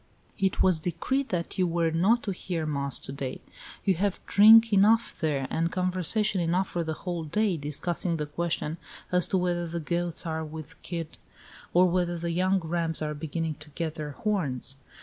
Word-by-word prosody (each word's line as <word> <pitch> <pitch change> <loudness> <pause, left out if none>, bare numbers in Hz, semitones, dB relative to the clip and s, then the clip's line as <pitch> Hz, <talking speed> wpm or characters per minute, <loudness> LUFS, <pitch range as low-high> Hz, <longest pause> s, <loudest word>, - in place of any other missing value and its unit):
"It 190 -1 +2
was 185 -4 +3
decreed 260 - -1
that 175 +1 -3
you 180 - +3
were 165 -1 +1
not 195 +9 +3
to 200 - -2
hear 175 -3 -3
mass 140 -3 -1
to - - -4
day. 135 -2 -5 0.5
You 195 - +4
have 200 -2 0
drink 225 +2 +7
enough 220 +4 +4
there, 145 -4 0
and 165 +1 0
conversation 185 +2 +1
enough 175 +3 +1
for 175 - -2
the 160 -1 -3
whole 175 -2 -2
day, 200 +5 +1
discussing 165 +3 -2
the 150 - -2
question 160 +1 -2 0.3
as 180 -1 +3
to 190 - +1
whether 175 -1 0
the 170 +1 -3
goats 170 +2 -1
are 160 -1 -2
with 155 -1 -9
kid 165 -3 -6 0.5
or 180 +1 +5
whether 175 -1 0
the 170 0 -3
young 185 +3 +2
rams 165 -1 -2
are 150 0 -2
beginning 155 +1 -3
to 150 0 -13
get 165 -2 -2
their 150 -2 -6
horns. 140 - -1
170 Hz, 185 wpm, -27 LUFS, 155-185 Hz, 0.5 s, drink